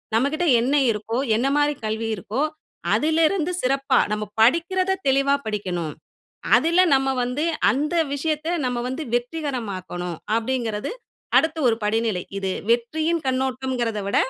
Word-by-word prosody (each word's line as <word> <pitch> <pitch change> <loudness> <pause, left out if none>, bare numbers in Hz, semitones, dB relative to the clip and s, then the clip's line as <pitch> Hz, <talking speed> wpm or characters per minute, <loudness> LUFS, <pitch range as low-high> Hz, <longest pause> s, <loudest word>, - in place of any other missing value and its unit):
நம்மகிட்ட 285 +9 +1 0.2
என்ன 265 +4 +1 0.2
இருக்கோ, 220 +2 -3 0.2
என்ன 240 +5 +1
மாரி 295 0 +3
கல்வி 220 +1 -2
இருக்கோ, 215 +6 -3 0.5
அதிலிருந்து 320 +2 +2
சிறப்பா, 275 +1 +2
நம்ம 210 0 -1 0.2
படிக்கிறத 340 +10 +3 0.2
தெளிவா 275 +1 +3
படிக்கணும். 180 -7 -3 0.6
அதில 335 +7 +3
நம்ம 270 0 +2 0.2
வந்து 250 +5 -2 0.3
அந்த 300 +5 -1 0.2
விஷயத்த 310 +2 -2 0.2
நம்ம 250 -1 -1
வந்து 260 +5 -4
வெற்றிகரமாக்கணும். 230 - -3 0.2
அப்டிங்கிறது 230 -3 -2 0.5
அடுத்த 320 0 +3
ஒரு 230 -2 +3
படிநிலை. 215 -3 0 0.2
இது 195 -1 -2 0.2
வெற்றியின் 310 +8 +1
கண்ணோட்டம்ங்கிறத 255 -3 -1
விட 200 - 0
255 Hz, 120 wpm, -23 LUFS, 220-300 Hz, 0.6 s, மாரி